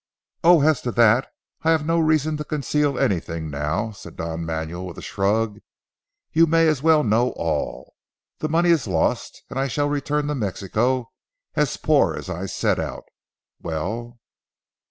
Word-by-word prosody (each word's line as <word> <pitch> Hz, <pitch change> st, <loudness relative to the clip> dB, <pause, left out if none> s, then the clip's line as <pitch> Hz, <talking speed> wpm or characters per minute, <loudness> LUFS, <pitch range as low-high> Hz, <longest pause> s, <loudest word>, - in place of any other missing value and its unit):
"Oh, 170 Hz, -3 st, +6 dB
as 155 Hz, -2 st, +3 dB
to 120 Hz, -, -2 dB
that 115 Hz, +2 st, +4 dB, 0.3 s
I 160 Hz, -, +1 dB
have 160 Hz, -2 st, +3 dB
no 165 Hz, +1 st, +2 dB
reason 155 Hz, -1 st, +2 dB
to 150 Hz, -, -4 dB
conceal 145 Hz, -1 st, 0 dB
anything 85 Hz, -4 st, -1 dB
now," 75 Hz, +10 st, -2 dB
said 100 Hz, -, -12 dB
Don 80 Hz, 0 st, -4 dB
Manuel 80 Hz, +3 st, -4 dB
with 85 Hz, -, -9 dB
a -, -, -7 dB
shrug, 105 Hz, +2 st, 0 dB, 0.7 s
"you 165 Hz, +1 st, +5 dB
may 165 Hz, +1 st, +4 dB
as 155 Hz, -4 st, +1 dB
well 155 Hz, -1 st, +4 dB
know 115 Hz, +3 st, +2 dB
all. 75 Hz, -6 st, -3 dB, 0.5 s
The 155 Hz, -, -2 dB
money 170 Hz, +2 st, +3 dB
is 155 Hz, -9 st, +2 dB
lost 85 Hz, -4 st, -1 dB
and 135 Hz, -, -4 dB
I 135 Hz, -, +1 dB
shall 145 Hz, +3 st, 0 dB
return 145 Hz, +1 st, -1 dB
to 150 Hz, -, -1 dB
Mexico 115 Hz, +2 st, -1 dB, 0.4 s
as 150 Hz, -2 st, 0 dB
poor 155 Hz, -2 st, +3 dB
as 95 Hz, -, -6 dB
I 95 Hz, +2 st, -4 dB
set -, -, 0 dB
out. -, -, -4 dB, 0.6 s
Well?" 110 Hz, +10 st, -4 dB
120 Hz, 165 wpm, -23 LUFS, 95-150 Hz, 0.7 s, Oh